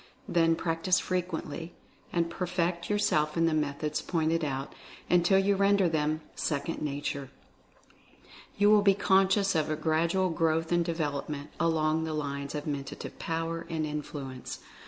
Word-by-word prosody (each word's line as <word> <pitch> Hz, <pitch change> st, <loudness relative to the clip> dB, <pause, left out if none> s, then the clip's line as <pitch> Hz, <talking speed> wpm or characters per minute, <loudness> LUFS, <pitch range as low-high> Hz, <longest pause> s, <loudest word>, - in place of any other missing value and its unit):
Then 165 Hz, -1 st, +3 dB
practice 165 Hz, +3 st, +1 dB
frequently, 170 Hz, -3 st, -3 dB, 0.4 s
and 170 Hz, -1 st, +1 dB
perfect 175 Hz, 0 st, -2 dB
your 210 Hz, -, +2 dB
self 150 Hz, -6 st, +1 dB
in 165 Hz, -, +4 dB
the 165 Hz, -, +2 dB
methods 150 Hz, 0 st, -1 dB
pointed 165 Hz, -1 st, 0 dB
out, 135 Hz, -2 st, -3 dB, 0.4 s
until 180 Hz, +2 st, +5 dB
you 195 Hz, +1 st, +3 dB
render 200 Hz, -1 st, +4 dB
them 155 Hz, -1 st, 0 dB
"second 150 Hz, +2 st, -2 dB
nature." 140 Hz, -2 st, -3 dB, 1.3 s
You 205 Hz, +1 st, +5 dB
will 210 Hz, -1 st, +7 dB
be 200 Hz, -1 st, +5 dB
conscious 195 Hz, +1 st, +3 dB
of 155 Hz, -3 st, +1 dB
a 155 Hz, -, 0 dB
grad 160 Hz, +2 st, +1 dB
ual 185 Hz, -2 st, +1 dB
growth 165 Hz, 0 st, +1 dB
and 175 Hz, 0 st, +3 dB
development, 150 Hz, -3 st, -3 dB
along 160 Hz, -1 st, +2 dB
the 160 Hz, -1 st, -3 dB
lines 140 Hz, -1 st, -3 dB
of 150 Hz, -, -4 dB
Men 140 Hz, -2 st, -2 dB
tative -, -, -8 dB
Power 165 Hz, 0 st, -3 dB
and 160 Hz, -1 st, -1 dB
Influence. 145 Hz, -3 st, -5 dB
165 Hz, 155 wpm, -29 LUFS, 150-175 Hz, 1.3 s, will